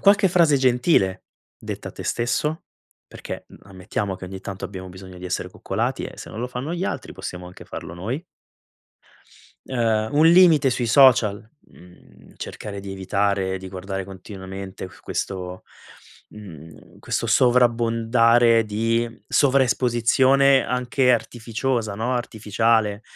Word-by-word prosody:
Qualche 200 Hz, 0 st, +5 dB
frase 170 Hz, -5 st, +4 dB
gentile 125 Hz, -, +2 dB, 0.3 s
detta -, -, -6 dB
a -, -, -10 dB
tè -, -, -8 dB
stesso? 150 Hz, +7 st, -1 dB, 0.4 s
Perché, -, -, -8 dB
mhmm, -, -, -16 dB
ammettiamo 95 Hz, +1 st, -4 dB
che 95 Hz, 0 st, -8 dB
ogni 95 Hz, +1 st, -8 dB
tanto 100 Hz, 0 st, -7 dB
abbiamo 95 Hz, -1 st, -9 dB
bisogno 95 Hz, 0 st, -11 dB
di 90 Hz, -, -10 dB
essere 90 Hz, -, -3 dB
coccolati, -, -, -3 dB
e -, -, -9 dB
se -, -, -9 dB
non -, -, -8 dB
lo 120 Hz, -, -2 dB
fanno 125 Hz, +6 st, -5 dB
gli 175 Hz, +2 st, -2 dB
altri, -, -, -4 dB
possiamo 90 Hz, 0 st, -7 dB
anche 90 Hz, -, -12 dB
farlo -, -, -8 dB
noi. 115 Hz, -, -4 dB, 1.4 s
Ehm, 115 Hz, -4 st, 0 dB
un 155 Hz, +2 st, +5 dB
limite 165 Hz, -5 st, +6 dB
sui 125 Hz, -1 st, -1 dB
social, 115 Hz, -5 st, +5 dB, 0.3 s
mhmm, 90 Hz, +1 st, -18 dB
cercare 100 Hz, -1 st, -7 dB
di 100 Hz, 0 st, -7 dB
evitare 95 Hz, 0 st, -1 dB
di 95 Hz, 0 st, -9 dB
guardare 95 Hz, +1 st, -5 dB
continuamente 95 Hz, 0 st, -8 dB
questo 90 Hz, -1 st, -5 dB, 0.7 s
mhmm, 80 Hz, -7 st, -13 dB
questo -, -, -2 dB
sovrabbondare 115 Hz, -1 st, +3 dB
di 115 Hz, +2 st, -1 dB
sovraesposizione 130 Hz, 0 st, +3 dB
anche 125 Hz, +1 st, +1 dB
artificiosa, 115 Hz, -1 st, -2 dB
no, 120 Hz, +4 st, -1 dB
artificiale, 110 Hz, -2 st, 0 dB
115 Hz, 130 wpm, -23 LUFS, 95-125 Hz, 1.4 s, limite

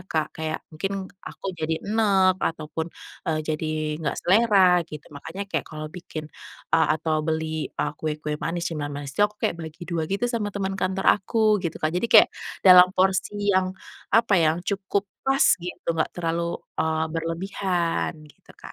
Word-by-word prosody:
Kak, 155 Hz, -1 st, -1 dB
kayak 160 Hz, 0 st, -3 dB
mungkin 195 Hz, +6 st, -3 dB, 0.4 s
aku -, -, -15 dB, 0.2 s
jadi 160 Hz, +1 st, 0 dB
eneg 195 Hz, -3 st, +3 dB
ataupun, 160 Hz, +1 st, -3 dB, 0.4 s
eee, 155 Hz, -1 st, +1 dB
jadi 155 Hz, 0 st, -2 dB, 0.3 s
gak 160 Hz, -, -2 dB
selera 190 Hz, -3 st, +5 dB
gitu, 150 Hz, -1 st, -9 dB
makanya 160 Hz, +7 st, -6 dB
kayak 200 Hz, -, -1 dB
kalau 155 Hz, -1 st, -7 dB
bikin, 165 Hz, -3 st, -7 dB, 0.5 s
eee, 160 Hz, -1 st, +5 dB
atau 155 Hz, -1 st, 0 dB
beli, 160 Hz, 0 st, -2 dB
eee, 150 Hz, -, -3 dB
kue-kue 150 Hz, -1 st, -3 dB
manis, 170 Hz, +1 st, -2 dB
cemilan 145 Hz, -2 st, -3 dB
manis 145 Hz, -1 st, -6 dB
itu 140 Hz, -, -4 dB
aku 210 Hz, -, -25 dB
kayak 170 Hz, -, 0 dB
bagi 160 Hz, +1 st, -8 dB
2 165 Hz, -2 st, -2 dB
gitu 200 Hz, +5 st, -1 dB
sama 235 Hz, -4 st, -1 dB
teman 195 Hz, -1 st, -3 dB
kantor 190 Hz, +1 st, -1 dB, 0.2 s
aku, 215 Hz, 0 st, +2 dB
gitu 170 Hz, -2 st, -3 dB
kan, 155 Hz, +1 st, -1 dB
jadi 180 Hz, +6 st, 0 dB
kayak 220 Hz, -, +8 dB, 0.4 s
dalam 180 Hz, -1 st, +9 dB
porsi 190 Hz, +1 st, +2 dB, 0.2 s
yang 185 Hz, 0 st, +1 dB, 0.4 s
apa 230 Hz, -2 st, +3 dB
ya, 160 Hz, 0 st, +3 dB
yang 175 Hz, -, -8 dB
cukup 200 Hz, +1 st, -1 dB, 0.2 s
pas 270 Hz, 0 st, +3 dB, 0.2 s
gitu, 180 Hz, +1 st, -8 dB
gak -, -, +2 dB
terlalu, 170 Hz, 0 st, -1 dB, 0.2 s
eee, 160 Hz, 0 st, +1 dB
berlebihan 170 Hz, +1 st, -1 dB
gitu 150 Hz, -, -20 dB
Kak. -, -, -11 dB
170 Hz, 170 wpm, -25 LUFS, 155-195 Hz, 0.5 s, dalam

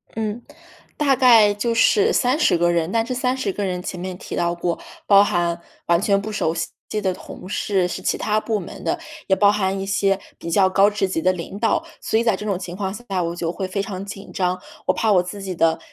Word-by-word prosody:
嗯， 220 Hz, +1 st, -3 dB, 0.6 s
大 280 Hz, -3 st, +3 dB
概 225 Hz, -5 st, +6 dB
就 230 Hz, +3 st, -1 dB
是 420 Hz, -, +4 dB
30 250 Hz, -, +3 dB
个 175 Hz, 0 st, +2 dB
人， 170 Hz, +1 st, 0 dB
但 225 Hz, 0 st, +1 dB
这 255 Hz, -, -3 dB
30 255 Hz, -5 st, -1 dB
个 205 Hz, -, -3 dB
人 180 Hz, -1 st, -2 dB
前 180 Hz, -1 st, -6 dB
面 185 Hz, 0 st, -5 dB
提 -, -, -7 dB
到 170 Hz, 0 st, 0 dB
过， 170 Hz, 0 st, -2 dB, 0.3 s
包 200 Hz, 0 st, +7 dB
含 170 Hz, -3 st, 0 dB, 0.3 s
完 170 Hz, +1 st, +3 dB
全 200 Hz, -1 st, +2 dB
不 215 Hz, +1 st, -5 dB
熟 160 Hz, -6 st, 0 dB
悉 165 Hz, -, -2 dB, 0.3 s
的 190 Hz, -2 st, 0 dB
同 185 Hz, -, -10 dB
事， 195 Hz, -2 st, 0 dB
是 -, -, -5 dB
其 -, -, 0 dB
它 215 Hz, 0 st, +1 dB
部 215 Hz, -1 st, -1 dB
门 175 Hz, -, -9 dB
的， 345 Hz, 0 st, -1 dB, 0.3 s
也 190 Hz, -, +4 dB
包 200 Hz, 0 st, +5 dB
含 195 Hz, -2 st, 0 dB
一 195 Hz, -, -3 dB
些 195 Hz, 0 st, +1 dB, 0.2 s
比 170 Hz, -, -6 dB
较 190 Hz, +1 st, +4 dB
高 195 Hz, +2 st, +5 dB
职 205 Hz, -2 st, -1 dB
级 165 Hz, -3 st, -2 dB
的 185 Hz, -, +3 dB
领 185 Hz, +2 st, -6 dB
导。 225 Hz, -, +1 dB, 0.2 s
所 220 Hz, -, +1 dB
以 -, -, +1 dB
在 225 Hz, -4 st, +3 dB
这 210 Hz, -, -7 dB
种 195 Hz, -3 st, -1 dB
情 175 Hz, -1 st, -6 dB
况 195 Hz, -1 st, -3 dB
下， 195 Hz, -6 st, -3 dB
我 170 Hz, +1 st, -3 dB
就 170 Hz, -1 st, -2 dB
会 190 Hz, -2 st, -3 dB
非 195 Hz, +1 st, -2 dB
常 195 Hz, -1 st, -5 dB
紧 195 Hz, 0 st, -9 dB
张。 180 Hz, -1 st, 0 dB, 0.3 s
我 -, -, +4 dB
怕 220 Hz, -1 st, +1 dB
我 180 Hz, -1 st, +4 dB
自 195 Hz, +3 st, -7 dB
己 190 Hz, -2 st, -4 dB
的， 165 Hz, -1 st, +2 dB
195 Hz, 250 characters per minute, -22 LUFS, 180-215 Hz, 0.6 s, 包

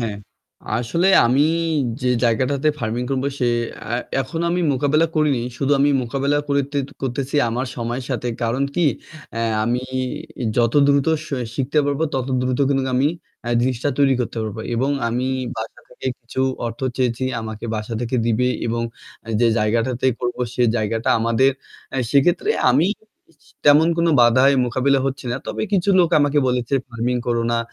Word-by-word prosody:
হ্যাঁ, 110 Hz, -3 st, -3 dB, 0.6 s
আসলে 165 Hz, +10 st, +1 dB, 0.2 s
আমি 130 Hz, +4 st, +3 dB, 0.6 s
যে 125 Hz, -, 0 dB, 0.2 s
জায়গাটাতে 130 Hz, +5 st, +1 dB
ফার্মিং 120 Hz, +1 st, -2 dB
করব 135 Hz, -1 st, -1 dB
সে 125 Hz, -, +1 dB, 0.8 s
এখন 135 Hz, +6 st, -5 dB
আমি 180 Hz, +1 st, 0 dB
মোকাবেলা 145 Hz, +5 st, +2 dB
করিনি 150 Hz, -5 st, +2 dB, 0.2 s
শুধু 140 Hz, +1 st, 0 dB
আমি 145 Hz, +1 st, +4 dB
মোকাবিলা 140 Hz, +4 st, 0 dB
করতে 140 Hz, 0 st, 0 dB, 0.2 s
করতেছি 135 Hz, +2 st, -2 dB
আমার 125 Hz, +3 st, -2 dB
সময়ের 120 Hz, +2 st, -3 dB
সাথে। 125 Hz, -1 st, -2 dB
কারণ 115 Hz, +4 st, 0 dB
কি 175 Hz, -, +2 dB, 0.5 s
আ -, -, -1 dB, 0.2 s
আমি 120 Hz, +2 st, 0 dB, 0.7 s
যত 115 Hz, -1 st, +2 dB
দ্রুত 140 Hz, 0 st, +3 dB, 0.2 s
স -, -, -11 dB, 0.3 s
শিখতে 140 Hz, +3 st, 0 dB
পারবো 145 Hz, +2 st, -1 dB
তত 130 Hz, -1 st, -1 dB
দ্রুত 125 Hz, 0 st, -1 dB
কিন্তু 135 Hz, -1 st, +1 dB
আমি 135 Hz, +3 st, +3 dB, 0.4 s
এ -, -, -1 dB
জিনিসটা 125 Hz, +2 st, 0 dB
তৈরি 135 Hz, -2 st, +4 dB
করতে 120 Hz, -, -3 dB
পারবো 110 Hz, 0 st, -5 dB
এবং 130 Hz, +4 st, 0 dB, 0.2 s
আমি 125 Hz, +2 st, -1 dB, 0.3 s
বাসা 110 Hz, 0 st, -6 dB
থেকে -, -, -8 dB
কিছু 120 Hz, +2 st, -5 dB, 0.3 s
অর্থ 115 Hz, 0 st, -6 dB, 0.2 s
চেয়েছি 125 Hz, -1 st, 0 dB, 0.2 s
আমাকে 110 Hz, 0 st, -7 dB
বাসা 110 Hz, +2 st, -5 dB
থেকে 120 Hz, +1 st, -1 dB
দিবে 120 Hz, +2 st, +2 dB, 0.2 s
এবং 115 Hz, 0 st, -1 dB, 0.6 s
যে 120 Hz, -, +5 dB
জায়গাটাতে 115 Hz, +4 st, 0 dB
করবো 120 Hz, 0 st, -3 dB
সে 125 Hz, -, +1 dB
জায়গাটা 110 Hz, +1 st, -1 dB
আমাদের 115 Hz, +4 st, +3 dB, 0.6 s
সেক্ষেত্রে 170 Hz, -, +3 dB, 0.2 s
আমি 165 Hz, -, +3 dB, 0.6 s
স -, -, -22 dB, 0.2 s
তেমন 150 Hz, +3 st, +6 dB
কোন 170 Hz, -, +3 dB
বাধায় 130 Hz, +4 st, +5 dB
মোকাবিলা 130 Hz, +3 st, +2 dB
হচ্ছে 135 Hz, 0 st, -4 dB
না। -, -, -1 dB
তবে -, -, -3 dB
কিছু 195 Hz, 0 st, +2 dB
লোক 170 Hz, -2 st, +4 dB
আমাকে 145 Hz, 0 st, +2 dB
বলেছে 125 Hz, +1 st, -1 dB
ফার্মিং 120 Hz, +1 st, -1 dB
করো 120 Hz, -1 st, +1 dB
না। 120 Hz, -, +1 dB
130 Hz, 160 wpm, -21 LUFS, 120-140 Hz, 0.8 s, তেমন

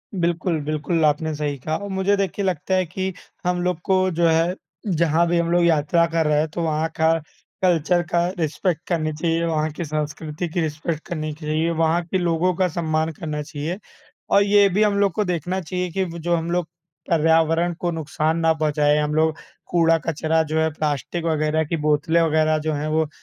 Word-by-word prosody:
बिल्कुल, 170 Hz, -2 st, 0 dB
बिल्कुल 155 Hz, +2 st, -1 dB
आपने 155 Hz, +1 st, +1 dB
सही 145 Hz, -1 st, -2 dB
कहा 155 Hz, +5 st, -2 dB
और 200 Hz, 0 st, -7 dB
मुझे 190 Hz, +1 st, +1 dB
देखिए 195 Hz, 0 st, -1 dB
लगता 185 Hz, +1 st, 0 dB
है 185 Hz, -1 st, +2 dB
कि 190 Hz, +3 st, -3 dB, 0.3 s
हम 180 Hz, 0 st, +1 dB
लोग 180 Hz, -2 st, -1 dB
को 185 Hz, -1 st, +3 dB
जो 170 Hz, +1 st, +2 dB
है, 165 Hz, +2 st, +2 dB, 0.3 s
जहाँ 170 Hz, -2 st, +2 dB
भी 175 Hz, 0 st, +1 dB
हम 170 Hz, 0 st, 0 dB
लोग 175 Hz, 0 st, +3 dB
यात्रा 165 Hz, +1 st, +3 dB
कर 165 Hz, -1 st, 0 dB
रहे 150 Hz, -1 st, +3 dB
हैं, 155 Hz, -, +1 dB
तो 170 Hz, -, -4 dB
वहाँ 160 Hz, 0 st, 0 dB
का 160 Hz, 0 st, +4 dB, 0.5 s
कल्चर 175 Hz, -1 st, +2 dB
का 170 Hz, 0 st, +2 dB
रिस्पेक्ट 165 Hz, +2 st, -1 dB
करनी 155 Hz, -3 st, 0 dB
चाहिए, 165 Hz, +2 st, 0 dB
वहाँ 155 Hz, -1 st, 0 dB
की 165 Hz, +2 st, -5 dB
संस्कृति 155 Hz, +2 st, -4 dB
की 170 Hz, +1 st, -1 dB
रिस्पेक्ट 155 Hz, +1 st, -3 dB
करनी 155 Hz, -3 st, -3 dB
चाहिए, 155 Hz, +1 st, -1 dB
वहाँ 165 Hz, +1 st, +2 dB
के 185 Hz, +3 st, -1 dB
लोगों 175 Hz, 0 st, +1 dB
का 185 Hz, +1 st, +2 dB
सम्मान 160 Hz, -1 st, -1 dB
करना 150 Hz, -1 st, -5 dB
चाहिए 150 Hz, +4 st, -4 dB, 0.5 s
और 200 Hz, -, +5 dB
ये 200 Hz, 0 st, +5 dB
भी 205 Hz, +3 st, +2 dB
हम 205 Hz, -1 st, +2 dB
लोग 200 Hz, -2 st, +3 dB
को 210 Hz, -, 0 dB
देखना 180 Hz, +1 st, -2 dB
चाहिए 180 Hz, +2 st, -3 dB
कि 190 Hz, +3 st, 0 dB
वो 170 Hz, -2 st, -6 dB
जो 175 Hz, +1 st, +1 dB
हम 165 Hz, +1 st, -2 dB
लोग 175 Hz, -2 st, 0 dB, 0.4 s
पर्यावरण 165 Hz, +1 st, +3 dB
को 175 Hz, -, -1 dB
नुकसान 160 Hz, 0 st, -1 dB
ना 165 Hz, 0 st, +3 dB
पहुँचाएँ, 150 Hz, -1 st, +2 dB
हम 150 Hz, 0 st, -1 dB
लोग 155 Hz, 0 st, +2 dB, 0.3 s
कूड़ा-कचरा 165 Hz, -1 st, +2 dB
जो 160 Hz, +1 st, -1 dB
है, 160 Hz, -, +2 dB
प्लास्टिक 155 Hz, +3 st, -2 dB
वगैरह 155 Hz, -1 st, +1 dB
की 165 Hz, +3 st, -2 dB
बोतलें 150 Hz, +2 st, +2 dB
वगैरह 155 Hz, -1 st, +2 dB
जो 155 Hz, 0 st, -2 dB
हैं, 150 Hz, +1 st, -2 dB
वो 155 Hz, 0 st, +1 dB
165 Hz, 200 wpm, -22 LUFS, 155-175 Hz, 0.5 s, और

